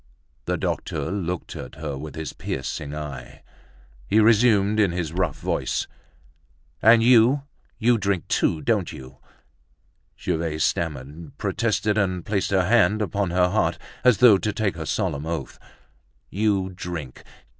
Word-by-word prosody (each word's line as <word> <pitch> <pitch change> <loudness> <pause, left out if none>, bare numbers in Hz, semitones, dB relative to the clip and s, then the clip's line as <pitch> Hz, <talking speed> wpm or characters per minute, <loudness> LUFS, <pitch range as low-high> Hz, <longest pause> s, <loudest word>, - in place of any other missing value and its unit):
The - - -1
doctor 80 - -3
looked 90 -3 -4
at 65 - -8
her 75 -2 -5
with 75 +3 -8
his 80 -3 -5
piercing 70 +2 -5
eye. 70 -4 -8 0.6
He 110 - +3
resumed 110 -2 +4
in 100 -4 +3
his 85 -2 -3
rough 90 -2 -1
voice: - - -1 1.0
"And 115 +1 +6
you, 125 +3 +5 0.3
you 120 0 +3
drink 100 -3 -1
too, 80 -2 +1
don't - - 0
you?" 65 0 -11 1.0
Gervaise 80 -1 -1
stammered, 75 0 -3
protested, 110 -2 0
and 90 -3 -1
placed 100 -2 -1
her 95 -2 +2
hand 110 0 +3
upon 100 -1 -1
her 90 +1 +2
heart, - - +1 0.3
as 125 -4 +5
though 115 -6 +7
to 105 - -1
take 105 -4 -1
her 80 -2 -6
solemn 80 -7 -2
oath. 85 -1 -5 0.7
"You 100 -2 +1
drink! 85 -8 -7
95 Hz, 140 wpm, -24 LUFS, 80-105 Hz, 1.0 s, though